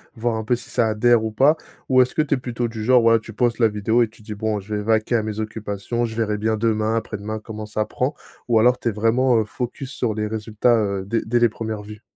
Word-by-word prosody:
voir 115 0 -1
un 110 - -3
peu 120 +3 +1
si 125 +1 -9
ça 120 -3 +2
adhère 115 +1 +3
ou 110 - -1
pas? 140 +8 +4 0.3
Ou 130 -2 +5
est-ce 125 - 0
que 155 - +3
tu 150 - -1
es - - +2
plutôt 120 -1 -3
du 110 -1 -6
genre, 125 +2 +5
voilà, 115 0 +5
tu 110 - -11
postes 120 +2 0
la 115 - +5
vidéo 110 +3 +1
et 115 - +3
tu 110 - -19
dis: 105 - -6
«Bon, 110 0 -1
je 100 +2 -8
vais 105 - -1
vaquer 110 +2 +1
à 110 - -1
mes 110 0 -4
occupations. 110 +2 -3
Je 110 -1 -6
verrai 110 -2 0
bien 110 +1 0
demain, 110 0 +1
après-demain, 110 -1 -4
comment 110 0 -7
ça 105 0 -1
prend», 130 +6 -2 0.3
ou 115 -2 +4
alors 125 +2 +4
tu 120 - 0
es - - -1
vraiment, 115 +4 +2
heu, 110 - 0
focus 125 +4 -5
sur 115 -5 -2
les 105 0 -1
résultats, 110 +2 +1
heu, 100 -3 0
dès 115 +4 0
dès 120 +3 +1
les 120 -1 +4
1res 110 -1 -5
vues? 105 +1 -11
110 Hz, 270 wpm, -22 LUFS, 105-120 Hz, 0.3 s, Ou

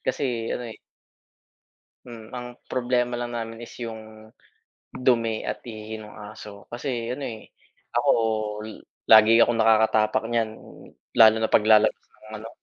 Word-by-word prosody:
kasi 120 -4 -2
ano 125 - -4
eh - - -14 1.3
Hmm 115 -2 -11
ang 125 0 -6 0.2
problema 125 -1 0
lang 120 0 -5
namin 115 -1 -5
is 120 - -10
yung 110 -1 -9 0.6
dumi 115 -3 +1
at - - -5
ihi 110 -1 -7
nung 105 -1 -11
aso 105 -1 -11
kasi 120 -1 -4
ano 140 +1 -6
eh, 110 -3 -8 0.5
ako, - - +3 0.6
i 110 - -8 0.4
lagi 110 +1 +8
akong 120 - +2
nakakatapak 110 -1 +3
niyan, 115 -2 0 0.7
lalo 110 -1 +8
na 110 - +1
pag-lalabas 110 0 +4
ng - - -21 0.2
ano, 115 - -8
115 Hz, 140 wpm, -24 LUFS, 110-120 Hz, 1.3 s, lagi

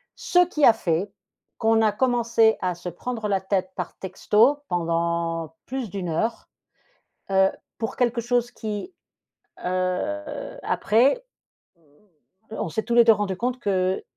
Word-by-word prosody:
Ce 360 - +1
qui 305 -4 +2
a 230 - +8
fait 180 +2 -1 0.5
qu'on 225 0 +3
a 215 - +4
commencé 230 -1 +2
à 180 -1 -1
se 175 +1 -6
prendre 220 +5 -4
la 195 -1 +1
tête 190 -1 -1
par - - -5
texto 215 +9 +2
pendant 170 -1 -1
plus 260 -4 -4
d'1 180 -2 -4
heure, 225 +9 -2 0.8
heu, 190 0 +5 0.3
pour 225 -1 -4
quelque 240 -2 +1
chose 240 0 0
qui, 220 - -5 0.7
heu, 185 - -2
après 265 - +2 0.5
mmh, - - -33 0.8
on - - -2
s'est 220 - -2
tous 235 - -1
les 235 -1 +7
2 225 - +7
rendus 200 -3 -1
compte 250 +3 -2
qu'il 185 -1 0
210 Hz, 145 wpm, -24 LUFS, 185-240 Hz, 0.8 s, a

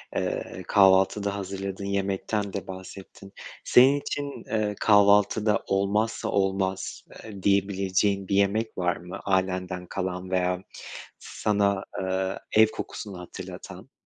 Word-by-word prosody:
eee, - - -3
kahvaltıda 100 +1 +4
hazırladığın 95 0 -5
yemekten 100 +1 -2
de 100 - -5
bahsettin. 95 +1 -10 0.3
Senin 135 +3 +6
için, 140 0 -5
ııı, 105 -1 0
kahvaltıda 105 +1 +4
olmazsa 105 +3 0
olmaz 95 -1 -1 0.2
eee, 100 -4 -10
diyebileceğin 100 0 +1
bir 100 - 0
yemek 105 +3 +1
var 90 -1 +1
mı 90 +1 -8
ailenden 95 -1 -1
kalan 90 0 -4
veya 90 0 0 0.6
sana, 100 -2 0 0.2
ııı, 95 0 -1 0.2
ev 110 0 +7
kokusunu 100 -3 -7
hatırlatan? 90 - -9
100 Hz, 110 wpm, -26 LUFS, 95-105 Hz, 0.6 s, ev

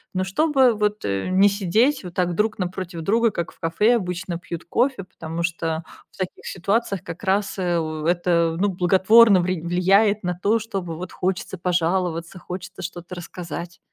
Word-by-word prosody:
но 185 - +1
чтобы 265 +4 +3
вот, 210 0 -1
э, 100 - -1
не 190 +2 +5
сидеть 210 +8 +2
вот 180 -1 -8
так 180 -1 +1
друг 215 +2 0
напротив 180 -1 -4
друга, 225 +7 +2
как 170 -3 -4
в - - -27
кафе 210 +8 +2
обычно 180 -3 -4
пьют 170 -1 -7
кофе. 255 -4 0
Потому 165 -1 -6
что, 165 -1 -2 0.3
в - - -21
таких 185 -1 -5
ситуациях 200 +1 -1
как 165 +4 -8
раз, 200 0 0
э, 175 -2 +1
у 155 -1 -4
это, 170 -1 +2
ну, 205 - +3
благотворно 190 +3 +5
ври 180 -1 -1
влияет 195 +5 +3
на 180 -1 -2
то, 215 +3 +3
чтобы 195 -7 -5
вот 180 +2 -7
хочется 190 +1 -2
пожаловаться, 175 0 -1
хочется 180 +1 -8
что-то 175 0 -7
рассказать. 175 0 -7
180 Hz, 170 wpm, -23 LUFS, 170-205 Hz, 0.3 s, не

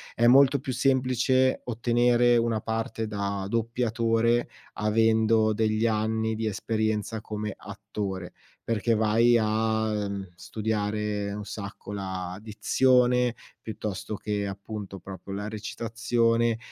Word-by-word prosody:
è 120 - +2
molto 135 +2 +6
più 130 -1 -4
semplice 130 0 +2
ottenere 120 +1 +3
una 115 -2 0
parte 115 0 -3
da 100 -2 -3
doppiatore 115 0 +1 0.2
avendo 110 +1 +3
degli 110 +1 +1
anni 110 0 0
di 110 0 -2
esperienza 110 +1 -1
come 105 -1 -4
attore, 100 -3 -6 0.3
perché 115 0 +1
vai 115 +2 +4
a, 110 -1 0
mhmm, 95 -2 -6
studiare 105 0 -2
un 105 0 -6
sacco 100 0 -7
la 95 -2 -5
dizione 125 +3 +2 0.3
piuttosto 105 -1 -5
che, 105 -1 -2
appunto, 100 0 -7
proprio 95 +1 -9
la 105 +2 -4
recitazione 115 +1 0
110 Hz, 110 wpm, -27 LUFS, 105-115 Hz, 0.3 s, molto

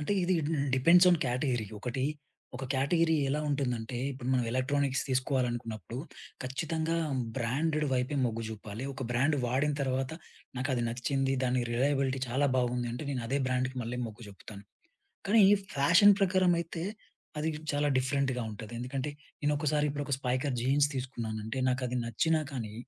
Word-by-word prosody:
అంటే 150 +7 -1
ఇది 185 +1 +2
హ్మ్, 145 -3 0
డిపెండ్స్ 170 +7 +6
ఆన్ 175 - +4
కేటగిరీ. 125 -2 0
ఒకటి 130 +3 -2 0.5
ఒక 135 - -5
కేటగిరీ 160 +5 +2
ఎలా 145 +3 0
ఉంటుందంటే, 125 -4 -1
ఇప్పుడు 130 -1 -6
మనం 125 -2 +2
ఎలక్ట్రానిక్స్ 135 +2 +1
తీసుకోవాలనుకున్నప్పుడు, 120 - -1 0.4
ఖచ్చితంగా 160 +5 -2 0.4
బ్రాండెడ్ 150 +5 0
వైపే 130 +3 0
మొగ్గు 115 -1 -1
జూపాలి. 110 +2 -7
ఒక 135 - -6
బ్రాండ్ 140 +5 +2
వాడిన 140 +4 +1
తర్వాత, 130 +1 -1 0.4
నాకది 130 -1 0
నచ్చింది. 135 +3 0
దాని 125 0 +1
రిలయబిలిటీ 135 +1 +1
చాలా 135 +4 +2
బావుంది. 125 -1 0
అంటే 125 +5 -5
నేనదే 125 +1 -1
బ్రాండ్‌కి 130 0 -1
మళ్ళీ 120 +2 -4
మొగ్గు 115 +1 -10
చూపుతాను. 100 +1 -11 0.6
కానీ 215 +1 +6 0.3
ఫ్యాషన్ 170 +9 +7
ప్రకారం 185 -2 +4
అయితే 165 0 -5 0.6
అది 155 +2 0 0.2
చాలా 145 0 +1
డిఫరెంట్‌గా 130 -1 0
ఉంటది. 110 +2 -8
ఎందుకంటే 130 +3 -3 0.3
నేనొక్కసారి 150 0 +1
ఇప్పుడు 145 0 -3
ఒక 140 - 0
స్పైకర్ 130 +1 -1
జీన్స్ 140 +3 +3
తీసుకున్నాను 120 -4 -4
అంటే 115 +4 -3
నాకది 125 -1 -1
నచ్చినా 155 +8 +1
కానీ, 115 -6 -5
130 Hz, 145 wpm, -30 LUFS, 125-145 Hz, 0.6 s, ఫ్యాషన్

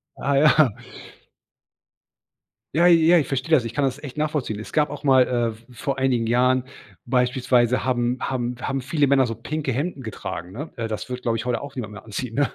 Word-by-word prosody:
Ah 140 0 -1
ja. 150 -4 +5 2.0
Ja, 170 +2 +4
ja, 170 0 +6
ich 155 - +1
verstehe 135 +4 -3
das. 150 -6 +5
Ich 115 0 -6
kann 145 +1 +1
das 135 +2 -3
echt 140 -2 -8
nachvollziehen. 150 -8 -2
Es 110 - -9
gab 150 -2 +2
auch 145 +1 -8
mal 130 -2 +6
äh, 120 -2 0
v 110 +1 -18
vor 135 +3 -3
einigen 130 -4 +1
Jahren 125 +2 +2 0.4
beispielsweise 125 0 +2
haben 125 -1 0
haben 125 -2 -2
haben 135 0 -2
viele 145 +2 +1
Männer 135 -1 +4
so 115 -1 -4
pinke 145 +5 -3
Hemden 140 +2 -3
getragen, 90 -5 -6
ne? 145 +11 -6
Äh, 115 -1 -3
das 110 - -4
würde, 125 0 -5
glaube 115 -2 0
ich, 115 - -5
heute 125 -1 -1
auch 140 -1 -9
niemand 110 -5 -5
mehr 105 - -10
anziehen, 115 +2 -5
ne? 140 -5 +1
130 Hz, 205 wpm, -23 LUFS, 120-140 Hz, 2.0 s, ja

